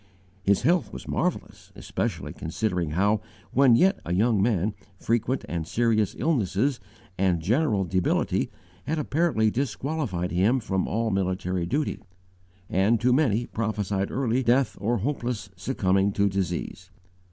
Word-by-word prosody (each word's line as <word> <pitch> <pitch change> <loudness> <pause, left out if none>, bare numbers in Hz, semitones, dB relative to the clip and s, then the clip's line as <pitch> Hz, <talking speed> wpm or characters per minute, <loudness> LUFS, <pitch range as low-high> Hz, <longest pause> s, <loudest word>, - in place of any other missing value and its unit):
His 100 +3 +2
health 170 +5 +2
was - - -9
marvelous, - - -3
especially - - -3
considering 90 -1 -2
how, 100 +6 +2 0.3
when 130 -2 +6
yet 190 - +3
a 90 - -2
young 110 +1 +3
man, 105 -2 +1 0.2
frequent 115 +5 -1
and 80 -2 -3
serious 110 +1 +1
illnesses 125 - +1 0.4
and 90 -3 +2
general 105 - +1
debility 90 0 0 0.4
had 160 +2 0
apparently 150 -8 +1
disqualified 130 - -2
him 100 +9 +3
from 95 -5 -1
all 115 0 0
military 95 -2 -1
duty, 145 - -1 0.7
and 100 +5 +2
to 125 +1 +3
many 120 -5 +2
prophesied 105 -4 -2
early 130 -1 0
death 125 +2 +2
or 115 +3 +1
hopeless 120 -4 -3
succumbing 95 -1 +1
to 100 0 +2
disease. 95 -1 -3
110 Hz, 130 wpm, -26 LUFS, 95-125 Hz, 0.7 s, when